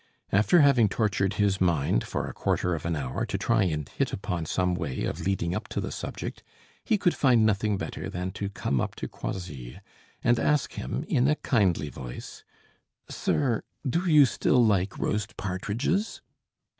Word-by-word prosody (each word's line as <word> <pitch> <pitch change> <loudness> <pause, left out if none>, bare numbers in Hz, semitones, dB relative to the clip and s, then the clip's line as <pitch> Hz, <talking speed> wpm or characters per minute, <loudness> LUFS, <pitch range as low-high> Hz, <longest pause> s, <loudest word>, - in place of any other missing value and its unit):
After 110 - +5
having 130 -7 +5
tortured 100 -2 0
his 100 -2 +1
mind 80 -9 +2
for - - -3
a - - -6
quarter 90 - 0
of 80 0 -3
an 85 - 0
hour 65 -4 -3
to - - -2
try 115 -4 +2
and 75 -5 -2
hit - - -2
upon 90 -5 -3
some 90 +1 +1
way 80 -7 -3
of - - -3
leading 90 -3 0
up - - -3
to - - -3
the - - -3
subject, - - -5 0.4
he 220 - +2
could 180 -3 +2
find 120 -5 +4
nothing 105 -1 +1
better - - -5
than 90 +1 -3
to 100 +1 -4
come 70 -9 -1
up - - -3
to - - -5
Croisilles, 70 -10 -6 0.4
and 120 0 +3
ask 150 -3 +1
him, 60 - -3
in 125 +2 +2
a 150 - +3
kindly 95 - +1
voice: 65 -4 -9 0.7
"Sir, 125 -6 0 0.3
do 170 +7 0
you 150 -2 +8
still 125 -1 +3
like 100 -3 +1
roast 105 -1 -2
partridges?" 105 - -2
100 Hz, 175 wpm, -27 LUFS, 85-120 Hz, 0.7 s, you